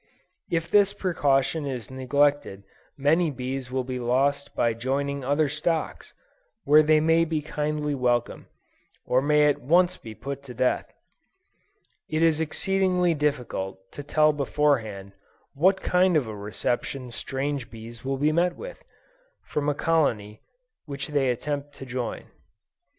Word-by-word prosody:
If 165 0 -2
this 200 -1 +5
precaution 145 -6 0
is 130 -2 -5
neglected 140 -5 +1 0.3
many 155 +4 +3
bees 130 -1 -5
will 130 0 -1
be 125 0 -4
lost 135 +4 0
by 115 -1 +2
joining 140 +4 -2
other 145 +3 +2
stocks, 155 +3 -3 0.5
where 150 +2 +6
they 155 0 +4
may 160 +2 +3
be 160 -1 -1
kindly 150 0 -2
welcomed, 120 -3 -1 0.6
or 130 - +2
may 150 +1 +4
at 145 - +2
once 175 +6 +3
be 110 -1 -10
put 140 +3 -6
to 130 -3 -11
death. 130 +1 0 1.2
It 155 +1 +1
is 160 -1 +3
exceedingly 180 +1 +1
difficult, 125 -11 -3
to - - -7
tell 155 +1 +3
before 145 -1 +2
hand, 100 -3 -9 0.4
what 185 +7 +2
kind 180 -1 +3
of 140 - +1
a 110 -1 -6
reception 120 +5 -3
strange 135 +2 -3
bees 115 +1 -11
will 135 0 -2
meet 155 +5 +2
with, - - -9 0.6
from 150 0 -2
a 145 - 0
colony 115 -11 0 0.4
which 140 -2 -5
they 140 -3 +1
attempt 145 +3 -3
to 135 - -9
join. 125 -2 -4
145 Hz, 140 wpm, -25 LUFS, 125-155 Hz, 1.2 s, where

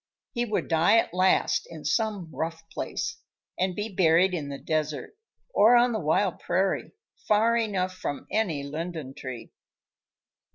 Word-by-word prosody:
He 240 0 -1
would 215 -3 -1
die 165 +6 +4
at 225 - +1
last 185 +1 +2
in 160 -3 -10
some 195 0 -1
rough 165 0 -4
place, - - -3 0.4
and 185 0 0
be 210 +1 -2
buried 180 -2 +3
in 150 -5 -3
the 140 - -5
desert 155 - -2 0.4
or 225 +4 +6
on 240 0 +5
the 220 - -1
wild 170 +4 +1
prairie, 190 +2 0 0.3
far 220 +2 +4
enough 195 -5 0
from 185 -6 -5
any 175 -10 0
linden 155 -1 -5
tree! 130 -4 -8
180 Hz, 150 wpm, -27 LUFS, 155-210 Hz, 0.4 s, or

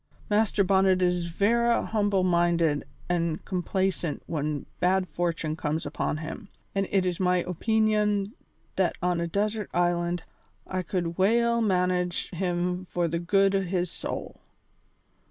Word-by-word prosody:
Master 210 -1 +3
Bonnet 190 0 +3
is 180 -1 +1
vera 235 +7 +2
humble 205 -3 +1
minded 170 -4 +2 0.2
an' 170 -2 0
complacent 185 -3 -1
when 150 -2 -2
bad 185 +1 +2
fortune 165 -3 -2
comes 155 0 -2
upon 145 +1 -2
him, 165 +7 -7 0.2
an' 195 -1 0
it 195 -2 +2
is 180 -2 -1
my 180 -1 +2
opeenion 210 +1 +1 0.5
that 185 -2 +2
on 180 -1 +1
a 170 - -1
desert 210 +3 -1
island 175 0 +1 0.4
I 185 0 -2
could 175 -1 -3
weel 235 +4 +3
manage 180 -3 0
him 180 0 -1
for 175 -1 -1
the 165 +1 -1
good 195 +3 +3
o' 195 - +2
his 180 -2 -1
soul." - - -6
180 Hz, 135 wpm, -27 LUFS, 170-195 Hz, 0.5 s, Master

